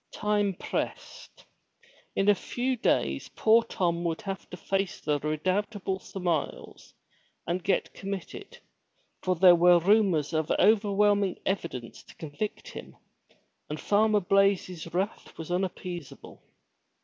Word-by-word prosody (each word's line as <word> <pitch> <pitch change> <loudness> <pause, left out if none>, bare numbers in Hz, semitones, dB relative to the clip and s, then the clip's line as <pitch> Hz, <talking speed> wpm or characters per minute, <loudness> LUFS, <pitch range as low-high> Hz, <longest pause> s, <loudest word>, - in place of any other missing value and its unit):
Time 205 -2 0
pressed. - - -6 0.7
In 195 - +1
a 205 - +7
few 250 +6 -2
days 70 - 0
poor 225 +1 +5
Tom 170 -6 -1
would 165 +1 -2
have 195 -2 -6
to 180 - -8
face 195 0 -2
the 150 -1 -1
redoubtable 185 +6 -2
Sir 195 - -9
Miles, 170 -5 -3 0.5
and 175 +1 -2
get 190 +1 0
committed, 200 - -7 0.6
for 185 -1 0
there 180 +1 +7
were 175 +1 +6
rumors 180 -5 +2
of 155 -1 0
overwhelming 205 -1 +3
evidence 150 - -4
to - - -17
convict 185 - -5
him, - - -10 0.7
and 150 +1 -4
Farmer 210 0 +2
Blaize's 185 -3 +1
wrath 190 +5 -3
was 165 +1 -7
unappeasable. 180 -3 -5
190 Hz, 125 wpm, -28 LUFS, 170-205 Hz, 0.7 s, a